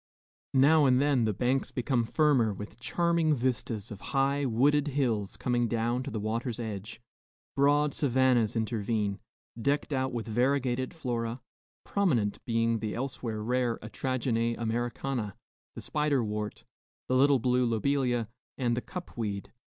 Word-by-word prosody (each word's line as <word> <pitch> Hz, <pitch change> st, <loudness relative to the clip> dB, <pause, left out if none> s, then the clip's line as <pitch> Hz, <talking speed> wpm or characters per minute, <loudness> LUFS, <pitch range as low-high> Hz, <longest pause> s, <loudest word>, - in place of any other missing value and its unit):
Now 145 Hz, +3 st, +6 dB
and 130 Hz, -1 st, +4 dB
then 140 Hz, -4 st, +3 dB
the 110 Hz, -, +1 dB
banks 125 Hz, +6 st, 0 dB
become 125 Hz, -1 st, 0 dB
firmer, 125 Hz, -6 st, +2 dB
with 105 Hz, +3 st, -9 dB
charming 170 Hz, +2 st, +1 dB
vistas 120 Hz, -4 st, -2 dB
of 105 Hz, -, -8 dB, 0.2 s
high, 140 Hz, +1 st, +2 dB
wooded 140 Hz, +5 st, +3 dB
hills 120 Hz, -8 st, -1 dB
coming 120 Hz, -1 st, +1 dB
down 120 Hz, +2 st, 0 dB
to -, -, -5 dB
the 110 Hz, -, -3 dB
water's 115 Hz, +3 st, -2 dB
edge; 110 Hz, -1 st, -5 dB, 0.6 s
broad 145 Hz, +1 st, +3 dB
savannas 130 Hz, -5 st, +2 dB
intervene, 110 Hz, -2 st, -1 dB, 0.4 s
decked 145 Hz, +3 st, 0 dB
out 130 Hz, -1 st, 0 dB
with 120 Hz, -2 st, -3 dB
variegated 130 Hz, +2 st, +1 dB
flora, 120 Hz, -5 st, -3 dB, 0.4 s
prominent 130 Hz, -, 0 dB
being 115 Hz, -1 st, +1 dB
the 105 Hz, 0 st, -3 dB
elsewhere 120 Hz, -4 st, -4 dB
rare 125 Hz, 0 st, 0 dB
atragene 115 Hz, 0 st, -1 dB
Americana, 120 Hz, -1 st, -2 dB, 0.4 s
the -, -, -6 dB
spider 150 Hz, -4 st, +1 dB
wort, 105 Hz, -1 st, -4 dB, 0.4 s
the 130 Hz, -, +1 dB
little 140 Hz, +1 st, +5 dB
blue 125 Hz, +1 st, +2 dB
lobelia, 120 Hz, 0 st, +1 dB, 0.3 s
and 120 Hz, -3 st, +1 dB
the 125 Hz, -, -2 dB
cup 180 Hz, +6 st, -8 dB
weed. 105 Hz, -4 st, -4 dB
120 Hz, 140 wpm, -29 LUFS, 115-135 Hz, 0.6 s, Now